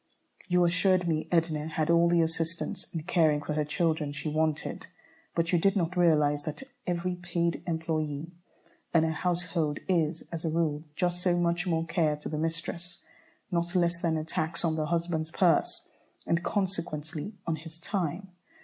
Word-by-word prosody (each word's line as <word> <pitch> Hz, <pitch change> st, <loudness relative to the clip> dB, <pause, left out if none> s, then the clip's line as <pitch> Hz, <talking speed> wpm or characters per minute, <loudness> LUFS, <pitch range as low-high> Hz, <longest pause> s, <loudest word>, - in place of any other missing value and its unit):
You 180 Hz, -1 st, +4 dB
assured 185 Hz, +1 st, +3 dB
me 155 Hz, -2 st, 0 dB
Edna 160 Hz, -3 st, +1 dB
had 160 Hz, 0 st, 0 dB
all 170 Hz, 0 st, +5 dB
the 170 Hz, -1 st, +4 dB
assistants 165 Hz, +1 st, -3 dB
in 165 Hz, -2 st, -4 dB
caring 160 Hz, -3 st, +3 dB
for 150 Hz, +1 st, -3 dB
her 150 Hz, 0 st, +1 dB
children 155 Hz, 0 st, 0 dB
she 145 Hz, +2 st, -4 dB
wanted, 155 Hz, 0 st, -1 dB, 0.5 s
but 165 Hz, 0 st, +1 dB
you 175 Hz, -, +5 dB
did 195 Hz, +4 st, +3 dB
not 180 Hz, -2 st, 0 dB
realize 150 Hz, -4 st, +4 dB
that 155 Hz, -, -5 dB, 0.2 s
every 180 Hz, +1 st, -1 dB
paid 170 Hz, -1 st, -1 dB
employé 160 Hz, -2 st, -2 dB, 0.6 s
in 160 Hz, -, +6 dB
a 160 Hz, -, +1 dB
household 165 Hz, -2 st, 0 dB
is, 165 Hz, -3 st, +1 dB
as 165 Hz, -2 st, -4 dB
a 165 Hz, -, 0 dB
rule, 155 Hz, -1 st, 0 dB
just 175 Hz, +1 st, 0 dB
so 180 Hz, -1 st, +2 dB
much 175 Hz, +1 st, +1 dB
more 165 Hz, -1 st, +1 dB
care 155 Hz, -2 st, +1 dB
to 150 Hz, -, -7 dB
the 150 Hz, -, -2 dB
mistress, 170 Hz, +2 st, -4 dB, 0.5 s
not 175 Hz, +1 st, 0 dB
less 170 Hz, -1 st, +2 dB
than 165 Hz, -2 st, +1 dB
a 155 Hz, -, -2 dB
tax 160 Hz, +1 st, -2 dB
on 160 Hz, -, +2 dB
the 155 Hz, -1 st, -1 dB
husband's 165 Hz, -1 st, -1 dB
purse 170 Hz, 0 st, +2 dB, 0.4 s
and, 170 Hz, 0 st, +1 dB
consequently, 175 Hz, -2 st, -2 dB
on 165 Hz, -2 st, 0 dB
his 160 Hz, +1 st, -10 dB
time. 180 Hz, +1 st, -2 dB
165 Hz, 170 wpm, -29 LUFS, 155-175 Hz, 0.6 s, in